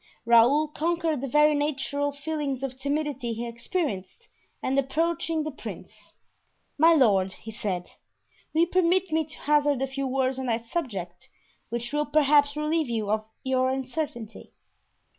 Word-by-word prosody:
Raoul 240 +7 +5
conquered 325 -2 -1
the 275 - -3
very 300 +3 +4
natural 285 -1 -1
feeling 285 -2 -3
of 265 -2 -3
timidity 280 -3 -2
he 235 +2 -4
experienced 235 - -4 0.3
and 260 - 0
approaching 325 +3 0
the 310 - -4
prince: 280 - -10 0.6
"My 325 +2 +6
lord," 195 -9 +3
he 220 - -10
said, 185 -5 -3 0.6
"will 320 - +2
you 340 - +4
permit 365 0 +2
me 320 0 +1
to 315 - -9
hazard 290 -2 +2
a 270 - +1
few 270 0 -3
words 260 0 0
on 260 - -3
that 230 0 -1
subject, 200 - -5 0.4
which 235 +3 -4
will 295 0 0
perhaps 290 -1 +4
relieve 305 -1 0
you 220 -3 -1
of 215 0 0 0.2
your 260 0 +1
uncertainty?" 260 -3 -4
275 Hz, 150 wpm, -26 LUFS, 235-305 Hz, 0.6 s, My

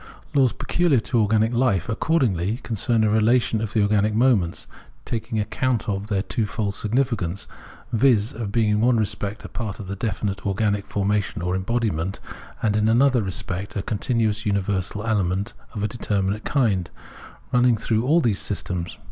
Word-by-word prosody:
Laws 135 -4 +4
pecuhar 170 -7 +1
to 120 +1 0
organic 110 +2 +2
life, 115 -8 +1
accordingly, 115 - +1
concern 115 0 +1
a 110 - +3
relation 110 +1 +3
of 110 -2 -4
the 110 - +3
organic 105 +1 +2
moments, 110 -8 +2 0.4
taking 115 0 -3
account 120 +3 -1
of 100 -1 -2
their 100 -3 0
two 115 -1 -1
fold 105 -2 -2
significance 105 -5 -1 0.3
— - - -21
viz. 115 -3 +3
of 110 -3 -4
being 110 -1 +2
in 105 0 +2
one 120 0 +4
respect 105 -1 -2
a - - -4
part 110 -3 -5
of 100 -1 -6
definite 100 -2 -2
organic 100 0 0
formation 100 -3 -1
or 90 +1 0
embodiment, 95 -3 -1 0.4
and 105 -2 +2
ia 105 - +2
another 120 +3 +4
respect 95 +1 -4
a 100 - -2
continuous 110 0 0
universal 100 0 -1
element 100 -1 0 0.2
of 105 - -3
a - - +2
determinate 105 -2 -1
kind, 105 - +1 0.6
running 125 -1 +4
through 110 +1 0
all 155 +7 +4
those 110 -8 +1
systems. 90 -2 -4
105 Hz, 165 wpm, -23 LUFS, 100-115 Hz, 0.6 s, Laws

